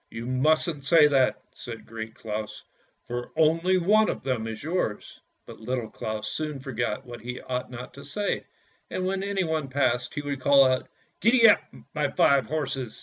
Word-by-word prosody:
" - - -47
You 115 +1 -7
mustn't 150 +4 +1
say 150 +2 +6
that," 135 -3 +2
said 115 -2 -9
Great 110 0 -7
Claus, 105 -1 -5 0.2
" - - -42
for 120 0 -4
only 165 +4 +3
one 210 +5 +4
of - - -4
them 120 -4 -1
is 110 +1 -6
yours." 160 - -3 0.3
But - - -11
Little 120 0 -3
Claus 110 -1 -4
soon 150 +5 -3
forgot 120 -5 -3
what 120 -2 -9
he 125 +2 -5
ought 125 0 -4
not 125 0 -8
to 140 - -11
say, 200 +9 -2 0.4
and 185 - -2
when 190 +1 -1
anyone 180 -7 -1
passed, 125 -2 0
he 145 - -3
would 140 -2 -4
call 140 0 +6
out, 130 0 +1 0.2
" - - -43
Gee 235 +1 +5
up, 210 - +7 0.3
my 150 -2 0
five 140 -2 +3
horses." 135 -5 -3
135 Hz, 190 wpm, -26 LUFS, 120-155 Hz, 0.4 s, up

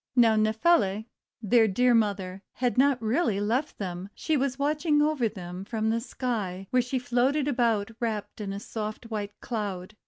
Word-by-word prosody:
Now, 230 -3 +5
Nephele, 215 - +2 0.4
their 225 +1 +5
dear 245 +5 +3
mother, 200 -4 0
had 245 -1 0
not 270 0 +4
really 225 - +1
left 240 +8 -1
them, 185 -1 -5 0.2
but 315 -2 +3
was 265 -1 -1
watching 295 +2 +1
over 295 -6 +2
them 180 -2 -7
from 220 +1 -1
the 230 +1 0
sky, 210 -7 -3
where 255 - +4
she 250 +2 -2
floated 255 +4 +1
about 230 -6 +1
wrapped 215 -3 -3
in 200 -1 -3
a 200 - -4
soft 215 +2 -6
wiiite 205 -2 -2
Cloud. 205 -4 -4
225 Hz, 165 wpm, -27 LUFS, 205-255 Hz, 0.4 s, Now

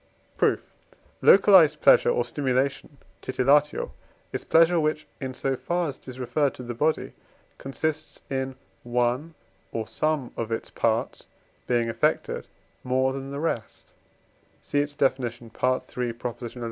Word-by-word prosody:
Proof. - - 0 0.5
Localized 180 -7 +7
pleasure - - +6
or 120 - +1
stimulation 135 +2 -1 0.2
(titillatio) 140 +3 +2 0.4
is - - -3
pleasure, 165 +1 +4
which, 155 0 0
in 130 -2 -5
so 135 0 -1
far 175 +4 -1
as 140 - -8
it - - -23
is 130 0 -8
referred 140 +3 0
to 125 - -8
the 120 0 -5
body, 150 +7 0 0.5
consists 155 +3 -3
in 130 -1 -3 0.3
one 125 +6 -1 0.4
or 110 -1 -3
some 155 -5 -1
of 115 -1 -4
its 115 - -3
parts 115 0 -1 0.4
being 120 -2 +1
affected 115 - 0 0.4
more 130 +1 +1
than 135 0 -6
the 140 +1 -5
rest 145 -8 -4 0.7
(see 145 - 0
its 145 0 -1
Definition, 120 -4 -1
III. 125 -1 -1 0.4
xi. 125 - -12
135 Hz, 135 wpm, -26 LUFS, 125-150 Hz, 0.7 s, Localized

